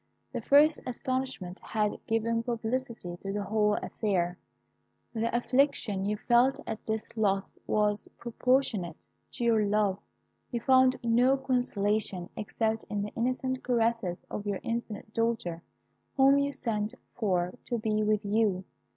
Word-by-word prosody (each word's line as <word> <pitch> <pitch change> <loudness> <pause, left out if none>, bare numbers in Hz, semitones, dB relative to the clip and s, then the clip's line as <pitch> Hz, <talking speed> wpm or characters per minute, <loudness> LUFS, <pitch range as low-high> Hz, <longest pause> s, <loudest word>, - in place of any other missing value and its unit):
The - - -2
first 295 +3 +5
astonishment 255 -7 -3
had 210 -2 -2
given 230 +1 +1
publicity 230 -5 -3
to 195 +2 -5
the 205 0 -2
whole 210 0 +2
affair. 180 -4 -1 0.7
The 230 0 0
affliction 245 -6 +1
you 210 +1 0
felt 250 +5 +3
at 220 - -5
this 220 0 -3
loss 195 -3 0
was 210 -1 +1
proportionate 235 - 0 0.4
to - - -4
your 225 -2 +4
love; 205 -1 +1 0.5
you 240 - -2
found 260 +1 +5
no 245 +3 +4
consolation 215 -8 0
except 220 +1 -1
in 205 -1 -1
the 205 - -3
innocent 255 +2 -1
caresses 230 -7 0
of 205 0 -5
your 200 -2 -1
infant 225 -2 -4
daughter, 225 -8 -1 0.6
whom 275 +1 +6
you 280 0 +1
sent 220 -6 -2 0.2
for 180 -5 0
to 240 - -1
be 215 -1 0
with 210 -1 +1
you. 200 -3 +1
220 Hz, 135 wpm, -29 LUFS, 205-245 Hz, 0.7 s, whom